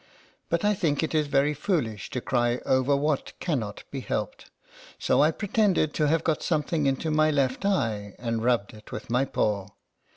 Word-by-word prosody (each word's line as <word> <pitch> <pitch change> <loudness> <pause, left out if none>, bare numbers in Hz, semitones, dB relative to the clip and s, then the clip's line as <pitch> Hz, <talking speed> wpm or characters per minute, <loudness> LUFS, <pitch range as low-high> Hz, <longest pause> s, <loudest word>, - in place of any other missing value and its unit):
But 170 +3 0
I 210 - +4
think 165 -7 0
it 160 - -2
is 155 -2 +2
very 145 +1 +2
foolish 130 - -2
to 125 - -3
cry 120 -1 +1
over 130 +2 +3
what 145 0 -1
cannot 115 - -2
be 140 - -4
helped, 105 -5 -4 0.5
so - - +2
I 150 - +5
pretend 205 +2 +1
ed 155 - +1
to 150 - +1
have 160 +2 +2
got 155 -2 0
something 155 -2 0
into 135 +4 0
my 155 0 +4
left 140 0 0
eye, 110 - 0
and 115 -1 -2
rubbed 120 -4 +1
it 105 0 -14
with - - -7
my 125 +3 +2
paw. 105 -7 -1
140 Hz, 190 wpm, -26 LUFS, 120-155 Hz, 0.5 s, I